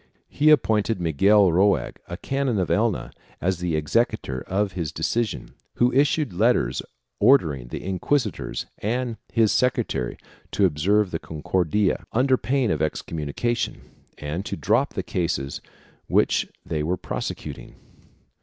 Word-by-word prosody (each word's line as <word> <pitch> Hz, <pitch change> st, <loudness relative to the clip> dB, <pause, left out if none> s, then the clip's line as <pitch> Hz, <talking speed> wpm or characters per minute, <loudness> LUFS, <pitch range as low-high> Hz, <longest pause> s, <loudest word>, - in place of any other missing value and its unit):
He 150 Hz, +2 st, +3 dB
appointed 110 Hz, -7 st, +3 dB
Miguel 95 Hz, +4 st, +4 dB
Roig, 95 Hz, +4 st, +2 dB
a 85 Hz, -, -6 dB
canon 135 Hz, 0 st, -1 dB
of 90 Hz, -4 st, 0 dB
Elna, -, -, 0 dB, 0.3 s
as 95 Hz, -1 st, 0 dB
the 90 Hz, -2 st, -1 dB
executor 75 Hz, -, 0 dB
of 100 Hz, +1 st, 0 dB
his 85 Hz, -5 st, -3 dB
decision, 115 Hz, -1 st, -2 dB, 0.2 s
who 120 Hz, +1 st, +2 dB
issued 140 Hz, -, +2 dB
letters 90 Hz, -, +2 dB, 0.4 s
ordering 80 Hz, -, +4 dB
the -, -, -6 dB
inquisitor 100 Hz, +5 st, -1 dB, 0.3 s
and 120 Hz, +1 st, -2 dB
his 110 Hz, -2 st, +3 dB
secretary 120 Hz, -, 0 dB, 0.4 s
to 100 Hz, -, +3 dB
observe 95 Hz, +5 st, +2 dB
the 80 Hz, -, -2 dB
Concordia, 90 Hz, +5 st, 0 dB
under 130 Hz, +3 st, +3 dB
pain 130 Hz, -3 st, 0 dB
of 75 Hz, -, -1 dB
excommunication, 80 Hz, +9 st, -2 dB, 0.4 s
and 75 Hz, +6 st, -4 dB
to -, -, -4 dB
drop -, -, +1 dB
the -, -, -2 dB
cases 85 Hz, -6 st, -2 dB, 0.5 s
which -, -, +2 dB, 0.2 s
they 80 Hz, -2 st, -2 dB
were 85 Hz, +4 st, -1 dB
prose -, -, -3 dB
cuting. -, -, -9 dB
95 Hz, 135 wpm, -24 LUFS, 80-120 Hz, 0.5 s, Miguel